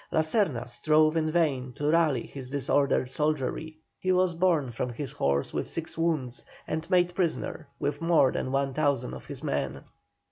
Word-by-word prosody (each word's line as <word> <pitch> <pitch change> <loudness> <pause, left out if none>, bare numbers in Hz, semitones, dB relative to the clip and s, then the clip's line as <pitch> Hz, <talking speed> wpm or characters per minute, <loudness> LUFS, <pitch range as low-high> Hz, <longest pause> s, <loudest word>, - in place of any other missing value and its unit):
La 160 - +3
Serna 155 - +1
strove 155 +6 +3
in 155 -1 +1
vain 145 -6 +1
to 145 - -5
rally 155 -7 +2
his 130 -3 -9
disordered 140 -1 +1
soldiery; 155 +2 -1 0.2
he 185 - 0
was 185 -1 +3
borne 165 -7 +2
from 120 +2 -3
his 135 +3 -5
horse 70 - 0
with - - -2
six 165 - -4
wounds, 155 -7 -1 0.2
and 160 +2 -4
made 180 -2 +3
prisoner, 170 -3 -2
with 145 +1 -2
more 165 -6 +4
than 130 - -3
1,000 135 - 0
of 65 - -9
his - - -7
men. 70 0 -2
150 Hz, 170 wpm, -28 LUFS, 130-165 Hz, 0.2 s, more